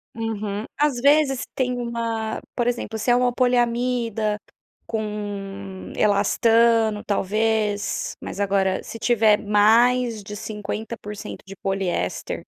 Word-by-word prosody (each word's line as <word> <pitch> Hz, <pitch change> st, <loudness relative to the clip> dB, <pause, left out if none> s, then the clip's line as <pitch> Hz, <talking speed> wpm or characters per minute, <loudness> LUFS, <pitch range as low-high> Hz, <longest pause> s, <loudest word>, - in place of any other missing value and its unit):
Uhum. 215 Hz, -2 st, -3 dB
Às 290 Hz, -4 st, +2 dB
vezes 280 Hz, -2 st, +4 dB
tem 250 Hz, -1 st, 0 dB
uma 230 Hz, -2 st, -3 dB, 0.2 s
por 240 Hz, 0 st, 0 dB
exemplo, 235 Hz, -2 st, -2 dB
se 230 Hz, -, -1 dB
é 240 Hz, -, +6 dB
uma 250 Hz, 0 st, +2 dB
poliamida 240 Hz, -3 st, +1 dB, 0.5 s
com 200 Hz, -3 st, -5 dB
elastano, 225 Hz, +1 st, +3 dB
talvez, 210 Hz, +1 st, 0 dB
mas -, -, -7 dB
agora 195 Hz, -1 st, +1 dB
se 230 Hz, -, -8 dB
tiver 220 Hz, -3 st, +4 dB
mais 225 Hz, +3 st, +4 dB
de 210 Hz, +1 st, -7 dB
50% 210 Hz, 0 st, -6 dB
de 195 Hz, -, -9 dB
poliéster 190 Hz, -, -2 dB
220 Hz, 110 wpm, -23 LUFS, 205-240 Hz, 0.5 s, é